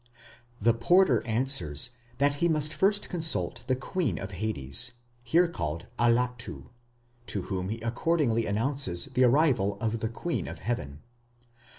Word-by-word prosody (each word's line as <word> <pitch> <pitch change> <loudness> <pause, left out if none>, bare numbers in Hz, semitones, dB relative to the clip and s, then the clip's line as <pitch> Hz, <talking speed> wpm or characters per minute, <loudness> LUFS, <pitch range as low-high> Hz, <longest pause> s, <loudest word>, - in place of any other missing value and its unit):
The 115 +2 +3
porter 135 - +3
answers 110 - +1 0.3
that 145 +1 +2
he 170 - +4
must 155 -2 +1
first 205 +3 +1
consult 165 -3 +1
the 130 - +2
Queen 135 - -2
of 95 +4 -6
Hades, 110 - +1 0.3
here 165 +9 +3
called 85 - -5
Allatu, 120 0 0 0.6
to 100 - -2
whom 95 -1 -4
he 110 +2 -4
accordingly 115 -1 0
announces 110 -4 0
the 130 +1 +4
arrival 125 -7 +2
of 115 0 -2
the 110 - -2
Queen 165 +9 -3
of - - -7
Heaven. 75 - -4
120 Hz, 135 wpm, -28 LUFS, 105-145 Hz, 0.6 s, he